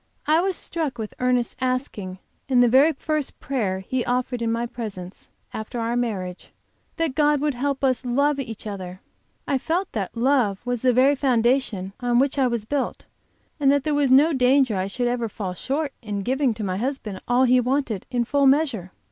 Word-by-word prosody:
I 310 +2 +4
was 380 0 0
struck 315 -7 -3
with 220 -2 -5
Ernest's 250 -1 +1
asking 255 -8 -2 0.3
in 255 -2 +4
the 245 - +6
very 270 +7 +5
first 305 0 -3
prayer 205 -9 -2
he 250 +6 -2
offered 245 0 -1
in 230 -1 0
my 230 +1 -1
presence, 205 -6 -7 0.2
after 220 +3 -5
our 230 +1 -1
marriage, 195 -7 -3 0.5
that 330 -5 -1
God 295 0 +3
would 295 0 0
help 275 +2 -2
us 260 -1 +2
love 280 +4 +1
each 225 -6 -6
other. 185 -3 -6 0.5
I 275 -2 +1
felt 345 +8 -1
that 210 +1 -4
love 240 -6 +2
was 245 -2 -2
the 255 - +4
very 260 +4 +4
foundation 240 -7 +1
on 245 -1 +1
which 275 +2 +2
I 260 - +4
was 235 -3 -2
built, 280 +3 -2 0.5
and 275 -2 +4
that 285 -1 +2
there 305 - 0
was 290 -2 +2
no 290 +5 +6
danger 260 -1 +3
that 190 - 0
I 190 - -2
should 245 +5 -2
ever 240 -2 -1
fall 195 -3 -5
short 275 - -2
in 205 -3 -4
giving 260 0 +1
to 215 - -5
my 185 -2 -2
husband 230 -5 -4
all 245 +1 +3
he 255 0 +5
wanted, 250 -5 -1
in 240 -2 0
full 280 +2 +2
measure. 265 - +1
250 Hz, 200 wpm, -23 LUFS, 220-275 Hz, 0.5 s, the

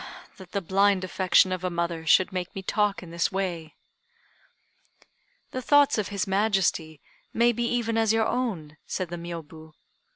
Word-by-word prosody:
that 185 -2 -13
the 200 - -2
blind 195 +1 +2
affection 185 0 +3
of 185 -1 -3
a 185 - 0
mother 170 -2 -3
should 185 +4 +4
make 180 -1 -4
me 195 - -5
talk 205 0 0
in 170 - -11
this 170 +2 0
way!" 175 -5 -4 1.8
"The 255 - -4
thoughts 285 -2 +4
of 210 - -1
his 200 -2 -2
Majesty 190 -6 0 0.4
may 235 +1 +4
be 240 +1 -2
even 230 -2 0
as 220 -1 +3
your 225 0 +2
own," 180 -12 -3
said 185 -3 -3
the 175 - -5
Miôbu. 160 -2 -9
190 Hz, 165 wpm, -26 LUFS, 170-215 Hz, 1.8 s, should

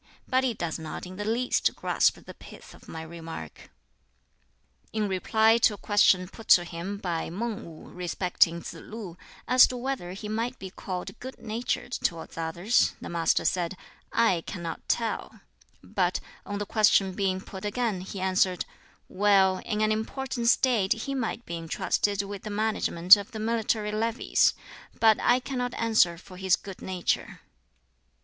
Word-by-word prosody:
But 260 0 +2
he 250 -3 0
does 170 -3 -3
not 160 +2 -6
in 185 +1 -9
the 205 - -4
least 235 +3 +1
grasp - - +2
the - - -12
pith - - -13
of - - -17
my 160 0 -7
remark." 160 - -9 1.2
In 215 -1 -1
reply 220 +4 +3
to 215 - +4
a - - -14
question 195 -3 +3
put 220 +3 -13
to 175 - +7
him 175 +4 -5
by 175 -5 -3
Mang 215 +5 -4
Wu 160 -2 -12
respecting 175 -1 +1
Tsz - - -6
lu 210 -6 -9 0.3
as 255 +1 +7
to 250 - -5
whether 245 -8 -3
he 205 +2 -7
might 230 +4 -2
be 190 -1 -8
called 185 +2 -6
good 260 +1 -8
natured 235 +2 -3
towards 170 -8 -3
others, 170 +8 +1
the - - -7
Master 170 -1 +1
said, 180 0 0 0.3
"I 225 -7 +3
cannot 170 -3 -6
tell"; 230 -2 -2 0.4
but, - - 0 0.3
on 205 - -3
the 205 - -3
question 200 -3 +3
being 190 -1 0
put 190 0 -10
again, 210 -2 -1
he 190 +1 -7
answered, 185 -1 +1 0.4
"Well, 190 -1 +3
in 215 -2 -1
an 215 0 +3
important 235 +2 -2
State 235 -6 +3
he 230 +5 -5
might 240 -2 -3
be 170 - -4
intrusted 190 +4 0
with 200 -1 -7
the 215 - -7
management 205 -4 +5
of 205 +5 -8
the 220 - -5
military 220 -1 0
levies; 225 +3 +2 0.4
but 220 -1 +5
I 245 - +4
cannot 250 -1 -3
answer 220 -7 +3
for 180 +1 -13
his 190 0 +3
good 195 -2 -10
nature." 185 -2 -2
205 Hz, 165 wpm, -27 LUFS, 180-225 Hz, 1.2 s, to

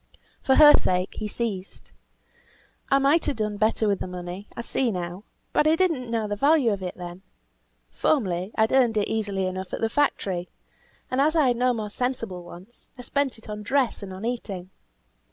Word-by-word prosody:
For 265 - +3
her 295 -1 +9
sake 180 0 0
he 215 - -3
ceased. 205 -4 -4 1.0
"I 275 - +5
might 280 +4 +3
have 280 - 0
done 210 -1 -2
better 220 +1 +2
with 200 -2 +1
the - - -4
money; 180 +2 -7
I - - -2
see 245 +1 0
now. 180 0 -5 0.3
But 300 - +3
I 315 - +5
did 370 +1 +3
not 255 -6 -4
know 225 -2 -1
the 205 - -2
value 280 0 +3
of 195 - -5 0.2
money. 175 0 -8 0.7
Formerly 185 - 0
I - - +1
had 220 - +3
earned 245 -4 +3
it 205 - +1
easily 205 -3 -1
enough 185 0 -5
at - - -2
the 225 - +1
factory, 195 -10 0 0.6
and 255 +1 +2
as 310 +3 +3
I 300 -5 +4
had 240 - +1
no 250 +1 +3
more 215 -3 -4
sensible 230 -7 -3
wants, 180 +7 -14
I 250 - -8
spent 280 0 -1
it 220 - -15
on 210 0 -6
dress 260 +2 0
and 195 -2 -7
on 190 +4 -7
eating. 195 -6 -4
220 Hz, 200 wpm, -25 LUFS, 190-255 Hz, 1.0 s, her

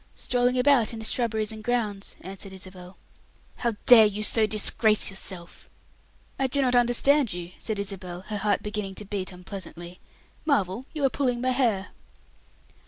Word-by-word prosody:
"Strolling 245 0 0
about 250 -4 +3
in - - -6
the 220 - -5
shrubberies 220 -3 -1
and 220 -1 -9
grounds," 215 -5 -2
answered 195 +1 -8
Isabel. 185 -1 -10 0.6
"How 235 -3 -1
dare 225 -3 +9
you 210 +1 -3
so 220 0 +6
disgrace 215 0 +2
yourself!" 185 -2 -5 0.7
"I 265 - +2
do 280 +2 -1
not 255 -2 +2
understand 245 +1 +3
you," 175 0 -7
said 220 -2 -3
Isabel, 190 -3 -5
her 210 +2 -5
heart 205 -1 0
beginning 210 -2 -4
to 210 - -8
beat 195 -2 -4
unpleasantly. 180 -1 -9 0.4
"Marvel, 250 - 0
you 300 -3 -1
are - - +4
pulling 250 -4 -1
my 255 +1 0
hair." 230 -7 0
215 Hz, 160 wpm, -26 LUFS, 190-245 Hz, 0.7 s, dare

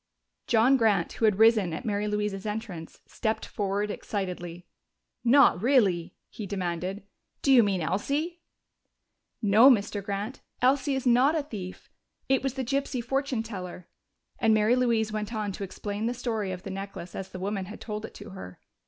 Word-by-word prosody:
John 245 +4 +5
Grant, 210 -7 +2
who 225 - 0
had 210 -3 +3
risen 220 -6 +5
at 160 - -5
Mary 210 -1 -1
Louise's 210 -1 -2
entrance, 210 -6 -6
stepped 220 -2 -2
forward 205 +1 -2
excitedly. 180 -4 -5 0.6
"Not 245 -7 +5
really?" 205 -9 +2
he 210 - -7
demanded. 185 +1 -3 0.4
"Do 275 - +5
you 250 - +8
mean 195 -4 +1
Elsie?" 295 - -1 1.0
"No, 215 +6 +7
Mr. 205 -4 +2
Grant, 205 +6 -4 0.2
Elsie 270 +2 +2
is 265 - -3
not 255 +5 +4
a 305 - -1
thief. 195 -10 -8 0.4
It 265 0 +3
was 270 -1 -2
the 265 -2 -2
gypsy 275 -1 -1
fortune 270 -2 -1
teller." 180 -5 -7 0.5
And 225 -4 +4
Mary 215 +3 +4
Louise 230 -4 +1
went 215 +1 -3
on 210 -2 -2
to 195 - -6
explain 205 +3 -4
the 245 - -1
story 225 -5 -2
of 180 0 -6
the 195 - -6
necklace 195 -2 -7
as 190 0 -6
the 190 - -8
woman 195 +1 -3
had 210 +4 -9
told 215 -1 -5
it - - -8
to 205 0 -10
her. 90 - -9
210 Hz, 170 wpm, -27 LUFS, 195-245 Hz, 1.0 s, you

